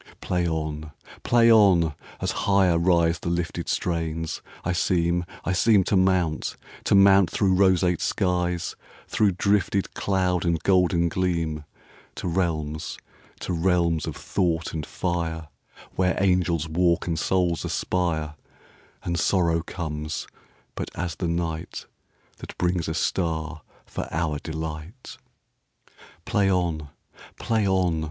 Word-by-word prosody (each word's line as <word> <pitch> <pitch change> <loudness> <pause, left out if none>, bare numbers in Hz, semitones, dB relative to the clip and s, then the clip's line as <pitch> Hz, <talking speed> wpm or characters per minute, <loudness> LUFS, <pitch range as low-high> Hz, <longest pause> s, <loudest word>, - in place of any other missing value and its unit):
Play 90 -1 -1
on! 80 -1 -3 0.3
Play 115 -1 +4
on! 95 -8 +5 0.3
As - - 0 0.2
higher 95 -4 +4
riseThe 85 -1 +2
lifted 85 -1 -2
strains, 80 -2 -2 0.2
I 90 - +1
seem, 85 0 +1 0.2
I - - 0
seemTo 100 +1 +3
mount, 95 -4 +1 0.3
to - - +3
mount 100 -1 +6
through 95 -3 +1
roseate 90 -2 +3
skies, 90 -2 -1 0.3
Through 105 -3 +2
drifted 100 0 +1
cloud 90 -3 0
and 85 -1 +1
golden 90 -3 +3
gleam, 85 -4 -1 0.5
To - - -4
realms, 80 -4 -2 0.4
to - - -3
realms 85 -2 +1
of - - -4
thought 85 -3 -1
and 80 -2 -4
fire, 80 -3 -3 0.5
Where 90 0 +1
angels 90 -4 +1
walk 85 +1 +1
and 80 -2 -1
souls 90 -1 +1
aspire, 80 -5 -1 0.7
And 85 0 -1
sorrow 85 -2 +2
comes 75 -3 -5 0.5
but - - -5
as 90 -1 -3
the 90 - -2
nightThat 85 0 -6
brings 90 -1 0
a 80 - -2
star 80 -3 -1 0.2
for - - -5
our 80 -3 -1
delight. 80 - -7 1.1
Play 100 -2 +2
on! 85 -5 -1 0.5
Play 110 -3 0
on! 90 -4 +1
85 Hz, 120 wpm, -25 LUFS, 80-95 Hz, 1.1 s, mount